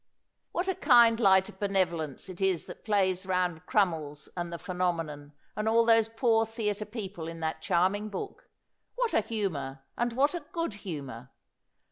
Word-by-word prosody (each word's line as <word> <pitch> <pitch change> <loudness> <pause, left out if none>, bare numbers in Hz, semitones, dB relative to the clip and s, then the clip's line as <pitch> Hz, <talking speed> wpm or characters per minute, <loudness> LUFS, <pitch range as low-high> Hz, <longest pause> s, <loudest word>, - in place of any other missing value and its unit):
What 355 +2 -1
a 380 - +2
kind 235 -7 +5
light 190 -3 +5
of - - -13
benevolence 175 -8 -1
it 185 0 -9
is 190 -4 +1
that - - -11
plays 190 -3 +1
round 180 -2 -1
Crummies 160 -7 0
and 175 -1 -3
the 170 - -4
Phenomenon, 165 -6 -3 0.2
and 215 +1 0
all 230 +1 +4
those 225 -1 +5
poor 225 0 +2
theater 215 -2 -2
people 200 -7 -6
in 165 0 -7
that 160 0 -2
charming 190 +4 +1
book! 195 - -7 0.5
What - - 0
a - - +4
humor! 155 -12 -3
and 240 0 -1
what 280 +6 +2
a 345 - -2
good 335 - -1
humor 140 - -7
190 Hz, 165 wpm, -29 LUFS, 165-225 Hz, 0.5 s, kind